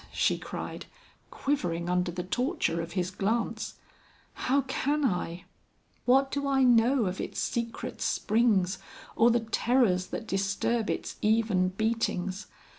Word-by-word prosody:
she - - +2
cried, - - -6 0.4
quivering 175 -12 -1
under 180 0 +1
the 180 +1 -4
torture 245 - 0
of 165 +1 -7
his 180 -1 -1
glance; 220 +5 -1 0.6
"how 275 +2 +1
can 285 +2 0
I? 180 -5 -1 0.6
What 270 +2 +4
do 280 0 -1
I 270 -1 +3
know 245 0 +4
of 185 0 -2
its - - -4
secret 235 +1 -3
springs 205 -4 +2 0.4
or 230 - +5
the 240 0 +3
terrors 225 -4 +2
that 225 - -5
disturb 200 +3 0
its - - -3
even 215 -4 +2
beatings? 200 -2 -1
225 Hz, 130 wpm, -29 LUFS, 185-245 Hz, 0.6 s, or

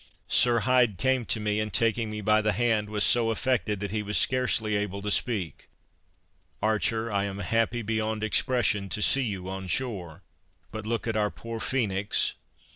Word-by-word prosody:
Sir 120 -2 +3
Hyde 125 -6 +3
came 130 -2 +1
to 110 - 0
me, 105 0 -1
and 110 0 -2
taking 115 -1 +1
me 105 0 -5
by 105 +1 +3
the 105 0 +1
hand 110 -3 +1
was 105 -1 +1
so 115 -2 +4
affected 115 -3 0
that 100 -2 -3
he 105 0 -1
was 105 0 -1
scarcely 125 -4 +1
able 100 -1 -2
to 105 - -2
speak 100 - -1 0.9
"Archer, 110 +1 0
I 100 -1 0
am 100 -1 -5
happy 115 +4 0
beyond 110 0 -2
expression, 110 -3 +1
to 105 - -2
see 135 - +4
you 100 -7 -3
on 95 0 -5
shore, 95 -7 -3 0.5
but 110 -1 -6
look 115 0 -2
at 115 - -1
our 105 -1 +1
poor 115 +1 -7
Phoenix!" 105 -6 0
110 Hz, 180 wpm, -27 LUFS, 105-115 Hz, 0.9 s, so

